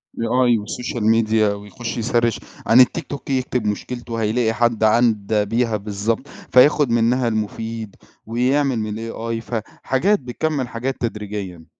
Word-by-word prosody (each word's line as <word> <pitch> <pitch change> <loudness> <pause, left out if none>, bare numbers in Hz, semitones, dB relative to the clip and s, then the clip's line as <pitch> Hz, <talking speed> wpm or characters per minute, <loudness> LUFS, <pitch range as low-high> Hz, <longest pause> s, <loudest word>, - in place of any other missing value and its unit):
AI 120 +1 +2
والsocial 120 +3 -4
media 110 -1 +3
ويخُش 105 +4 -6
يsearch 115 0 +1 0.3
عن 115 - +6
الtiktok 140 +3 -1
يكتب 130 -3 -1
مشكلته 120 +3 -4
وهيلاقي 115 +1 +1
حد 120 -2 +1
عدّا 110 -2 +3
بيها 115 +1 0
بالضبط، 105 +5 -2
فياخد 145 +2 +3
منّها 120 +2 +2
المفيد 110 0 -3 0.3
ويعمل 125 +3 +1
من 110 -1 -3
الAI، 115 0 -4
فحاجات 130 - -1
بتكمِّل 135 +1 -2
حاجات 125 +3 -3
تدريجيًا. 105 -6 -5
115 Hz, 120 wpm, -21 LUFS, 110-125 Hz, 0.3 s, عن